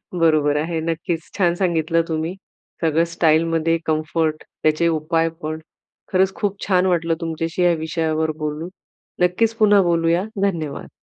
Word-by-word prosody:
बरोबर 155 -4 +2
आहे, 160 +2 -1
नक्कीच 165 +1 -3
छान 175 -3 +3
सांगितलं 165 -2 +1
तुम्ही. 160 +2 -2 0.5
सगळं 165 0 +3
स्टाईलमध्ये 165 0 +2
कम्फर्ट 155 0 0 0.2
त्याचे 155 +2 +2
उपाय 165 +1 +1
पण. 155 +1 -3 0.5
खरंच 190 +1 +2
खूप 205 -2 -2
छान 185 -1 +3
वाटलं 170 -2 +1
तुमच्याशी 165 +1 -2
या 175 -1 +5
विषयावर 160 -1 -1
बोलून. 155 +2 -4 0.5
नक्कीच 215 +6 +2
पुन्हा 205 -2 +5
बोलूया. 170 +2 +2 0.2
धन्यवाद. 160 -8 -2
165 Hz, 130 wpm, -21 LUFS, 155-175 Hz, 0.5 s, या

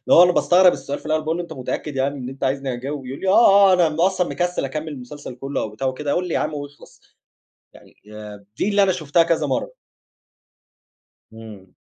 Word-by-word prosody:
هو 175 - +9
أنا 180 - +4
باستغرب 180 +1 +4
السؤال 140 +1 -5
في - - -21
الأول 155 0 0
باقول 160 +2 -2
له: 175 - -2
"إن - - -8
أنت - - -7
متأكد 140 +3 -4
يعني 135 +2 -1
إن 125 -1 -6
أنت 135 +1 -9
عايزني 135 -1 -1
أجاوب" 135 +2 -6
يقول 135 +2 -7
لي: 195 - -4
"آه، 200 -2 +6
آه - - +5
أنا 175 -3 +3
م 155 +2 -3
أصلًا 185 -1 +2
مكسِّل 175 -4 -2
أكمِّل 150 +4 -5
المسلسل 140 -2 -9
كلّه" 135 +3 -4
أو - - -4
بتاع 110 +6 -4
وكده، 140 +2 -2
"قل 180 0 -1
لي - - -4
يا - - +1
عم 155 - -2
واخلَص" 145 -1 -10 0.7
يعني - - -19 0.2
آآ 105 -1 -10
دي 205 - 0
اللي 200 -1 +3
أنا 190 - +3
شُفتها 165 -2 +1
كذا 165 -1 0
مَرّة. - - -3 1.6
إمم. 105 -5 -13
150 Hz, 220 wpm, -21 LUFS, 130-175 Hz, 1.6 s, هو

